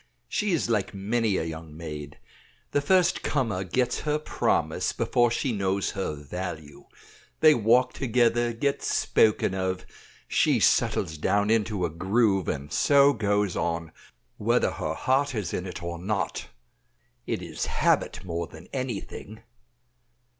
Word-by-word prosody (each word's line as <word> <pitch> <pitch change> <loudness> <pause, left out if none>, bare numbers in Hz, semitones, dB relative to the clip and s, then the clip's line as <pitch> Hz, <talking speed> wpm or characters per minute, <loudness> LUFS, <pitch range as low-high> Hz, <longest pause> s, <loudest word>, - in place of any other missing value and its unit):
She 210 -1 -1
is 165 -9 +1
like 105 -4 -1
many 105 +1 0
a - - -1
young 80 -1 -7
maid. 75 -3 -7 0.5
The 145 - +2
first 180 +4 +3
comer 115 -10 -1
gets 125 +7 0
her 150 0 0
promise 155 - 0
before 120 -1 +2
she 120 +3 -1
knows 100 -2 0
her 95 -6 -3
value. 80 0 -7 0.6
They 155 -1 +8
walk 125 +1 +3
together, 120 -1 +2
get 140 +5 -1
spoken 105 -3 +2
of; 95 -1 -2 0.4
she - - +2
settles 80 -1 +2
down 100 +5 +1
into 105 -4 +1
a 85 - -3
groove, 95 +2 +1
and 75 +2 -4
so 140 0 +5
goes 105 -4 0
on, 85 -1 -2 0.5
whether 120 +3 +2
her 80 -4 -3
heart 135 - +1
is 100 -6 -3
in 90 - -3
it 90 - -7
or 85 0 -4
not; 100 +3 -2 0.8
it 90 - -2
is 80 -3 -4
habit - - +1
more 85 -1 -3
than 80 +3 -14
anything." 115 -4 -5
100 Hz, 140 wpm, -26 LUFS, 85-120 Hz, 0.8 s, They